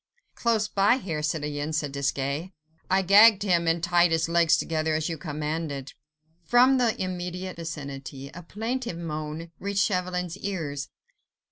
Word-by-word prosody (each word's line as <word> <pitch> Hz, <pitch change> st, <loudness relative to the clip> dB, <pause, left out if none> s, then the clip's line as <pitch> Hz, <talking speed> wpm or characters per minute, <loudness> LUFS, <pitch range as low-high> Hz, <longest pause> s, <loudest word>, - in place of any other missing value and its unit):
"Close 225 Hz, -3 st, +1 dB
by 205 Hz, +4 st, +3 dB
here, 165 Hz, -11 st, -4 dB
citoyen," 150 Hz, -1 st, -2 dB
said 150 Hz, -2 st, -1 dB
Desgas; 140 Hz, +4 st, -2 dB, 0.4 s
"I 190 Hz, +1 st, +3 dB
gagged 205 Hz, +2 st, +7 dB
him 170 Hz, -4 st, +2 dB
and 165 Hz, 0 st, +1 dB
tied 175 Hz, 0 st, +4 dB
his 165 Hz, 0 st, +1 dB
legs 170 Hz, -1 st, +4 dB
together 155 Hz, -1 st, -1 dB
as 155 Hz, +1 st, -1 dB
you 165 Hz, -, -2 dB
commanded." 150 Hz, -2 st, -4 dB, 0.5 s
From 250 Hz, +7 st, +5 dB
the 235 Hz, -3 st, +1 dB
immediate 180 Hz, 0 st, -4 dB
vicinity, 140 Hz, -4 st, -7 dB
a 180 Hz, -, -8 dB
plaintive 225 Hz, +3 st, -4 dB
moan 155 Hz, 0 st, -5 dB
reached 200 Hz, 0 st, 0 dB
Chauvelin's 180 Hz, -1 st, -2 dB
ears. 155 Hz, -8 st, -4 dB
170 Hz, 140 wpm, -26 LUFS, 150-190 Hz, 0.5 s, gagged